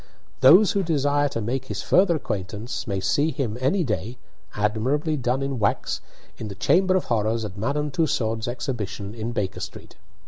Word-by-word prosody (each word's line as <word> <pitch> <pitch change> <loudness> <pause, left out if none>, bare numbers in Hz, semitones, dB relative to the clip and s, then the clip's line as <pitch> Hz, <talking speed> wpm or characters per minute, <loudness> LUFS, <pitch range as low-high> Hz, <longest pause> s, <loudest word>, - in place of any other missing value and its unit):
Those 185 +10 +7
who 200 - +1
desire 145 -4 +1
to 115 -4 -3
make 125 +5 -2
his 105 -5 -4
further 185 -2 +4
acquaintance 105 - -4
may 100 -2 -1
see 140 +11 +2
him 130 -9 -2
any 160 +8 +2
day 115 - -3 0.4
(admirably 125 +10 0
done 130 0 0
in 135 -2 -2
wax) 100 -1 0 0.4
in 110 - -5
the 100 - -7
Chamber 185 - +3
of 185 - +2
Horrors 110 0 0
at 95 -3 -7
Madame 145 +8 -1
Tussaud's 115 -6 0
exhibition, 115 -5 -4
in 115 +1 -4
Baker 105 -6 -2
Street. - - -9
125 Hz, 170 wpm, -24 LUFS, 105-145 Hz, 0.4 s, Those